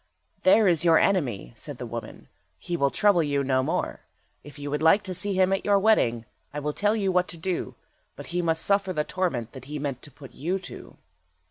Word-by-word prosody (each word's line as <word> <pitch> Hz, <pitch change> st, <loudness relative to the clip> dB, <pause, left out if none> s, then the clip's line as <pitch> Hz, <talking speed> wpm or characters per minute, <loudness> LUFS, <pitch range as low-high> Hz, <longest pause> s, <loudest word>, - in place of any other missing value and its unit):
"There 225 Hz, -7 st, +5 dB
is 170 Hz, -2 st, +3 dB
your 165 Hz, -2 st, +5 dB
enemy," 125 Hz, -, 0 dB
said -, -, -7 dB
the -, -, -6 dB
woman, -, -, -8 dB, 0.3 s
"he 175 Hz, -, -4 dB
will 140 Hz, -4 st, +2 dB
trouble 190 Hz, +6 st, +3 dB
you 145 Hz, -2 st, 0 dB
no 130 Hz, -1 st, +1 dB
more. -, -, -2 dB, 0.4 s
If 145 Hz, +1 st, -13 dB
you 145 Hz, 0 st, -6 dB
would 150 Hz, -, -1 dB
like 165 Hz, +6 st, +5 dB
to 190 Hz, -2 st, -5 dB
see 195 Hz, +3 st, -1 dB
him 190 Hz, 0 st, +3 dB
at 195 Hz, -, -1 dB
your 205 Hz, -1 st, +3 dB
wedding, 125 Hz, -, +2 dB, 0.3 s
I 150 Hz, -, -7 dB
will 150 Hz, 0 st, -3 dB
tell 210 Hz, +5 st, +1 dB
you 195 Hz, -3 st, 0 dB
what 180 Hz, 0 st, +2 dB
to 170 Hz, -, -7 dB
do, 180 Hz, +2 st, -3 dB, 0.4 s
but -, -, -9 dB
he 175 Hz, -, +1 dB
must 165 Hz, -1 st, 0 dB
suffer 200 Hz, -2 st, +1 dB
the 150 Hz, -2 st, 0 dB
torment 150 Hz, -11 st, -2 dB
that 130 Hz, -2 st, -11 dB
he 150 Hz, +2 st, -6 dB
meant 140 Hz, -3 st, -4 dB
to -, -, -9 dB
put 135 Hz, 0 st, -14 dB
you 175 Hz, +6 st, -2 dB
to." 190 Hz, -, -11 dB
165 Hz, 225 wpm, -26 LUFS, 140-190 Hz, 0.4 s, There